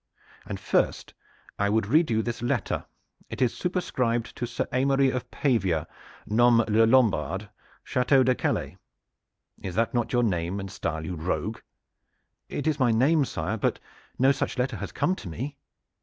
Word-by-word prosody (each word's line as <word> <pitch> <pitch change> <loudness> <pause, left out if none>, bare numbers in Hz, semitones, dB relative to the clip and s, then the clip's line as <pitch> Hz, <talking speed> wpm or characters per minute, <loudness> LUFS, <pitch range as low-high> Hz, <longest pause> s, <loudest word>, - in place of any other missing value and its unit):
And - - -5
first - - 0 0.5
I 100 0 +2
would 110 0 +2
read 155 +10 +3
you 110 -1 +1
this 120 0 -4
letter. 120 - -1 0.4
It - - -6
is 125 -3 +2
superscribed 125 -10 -1
to 120 - -3
Sir - - -3
Aymery 135 +1 +3
of 125 -1 -4
Pavia, 95 - +1 0.4
nomme 115 +1 +4
Le 110 +1 +4
Lombard, 105 -5 +2 0.3
Chateau 130 +1 +3
de 130 0 +3
Calais. - - -2 0.8
Is 90 -2 -5
not 115 +2 +1
that 120 -2 -1
your 120 -1 +2
name 90 -2 -1
and 95 -1 -6
style, 80 -2 -3
you 90 - -4
rogue?" 90 +6 -2 0.9
"It 145 - -4
is 155 -2 +1
my 130 -2 +4
name, 140 +6 +3
sire; 90 +1 -3
but - - 0 0.4
no 135 +2 +5
such 135 - -2
letter 125 +1 -1
has - - -6
come 180 - +1
to 95 - -8
me." 135 - -5
115 Hz, 165 wpm, -26 LUFS, 100-130 Hz, 0.9 s, no